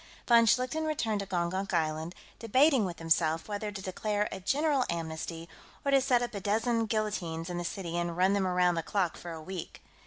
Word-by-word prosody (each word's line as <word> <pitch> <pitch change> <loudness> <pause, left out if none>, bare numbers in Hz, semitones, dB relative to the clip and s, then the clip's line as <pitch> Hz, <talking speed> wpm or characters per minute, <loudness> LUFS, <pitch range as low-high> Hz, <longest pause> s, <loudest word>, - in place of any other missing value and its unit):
Von 235 -1 +6
Schlichten 255 +8 +2
returned 225 -9 0
to 200 - -4
Gongonk 185 +1 -1
Island, 160 +1 -1 0.2
debating 255 +2 +4
with 175 -3 -5
himself 165 0 +1
whether 210 0 -3
to 200 -1 -7
declare 210 +2 -1
a - - -5
general 280 +7 +1
amnesty 165 0 -4 0.4
or 280 - +2
to 275 -1 +5
set 250 -2 +3
up 240 - -4
a 200 - -3
dozen 225 +3 +1
guillotines 180 -7 -2
in 175 - -3
the - - -3
city 170 -1 -4
and 170 -1 -2
run 190 +2 +4
them 195 -2 +1
around 180 -1 +3
the 165 - -1
clock 185 -1 -1
for 175 - -8
a 165 - -6
week. 180 +2 -7
195 Hz, 205 wpm, -30 LUFS, 170-225 Hz, 0.4 s, Von